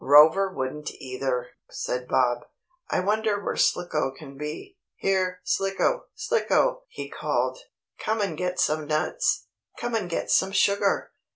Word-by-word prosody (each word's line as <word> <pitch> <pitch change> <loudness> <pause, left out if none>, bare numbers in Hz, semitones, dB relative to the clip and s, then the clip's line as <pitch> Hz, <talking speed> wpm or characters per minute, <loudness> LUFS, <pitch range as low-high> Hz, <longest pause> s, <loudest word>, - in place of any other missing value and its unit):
"Rover 160 +7 +7
wouldn't 150 -1 -3
either," 130 -1 -3 0.2
said 125 0 -3
Bob. 120 -1 +2 0.4
"I - - +1
wonder 210 +1 +1
where 205 - -3
Slicko 155 -5 +1
can 135 +1 -11
be. 155 - -7 0.2
Here, 185 -1 0
Slicko! 195 - +1
Slicko!" - - +1
he 470 - -6
called. - - -1 0.4
"Come 220 +1 0
and 195 -6 0
get 180 +2 -2
some 155 -3 +1
nuts! 155 0 +1 0.3
Come 240 0 -3
and 210 -6 0
get 170 - -2
some 190 +1 +3
sugar!" 200 0 +2
180 Hz, 135 wpm, -26 LUFS, 150-205 Hz, 0.4 s, Rover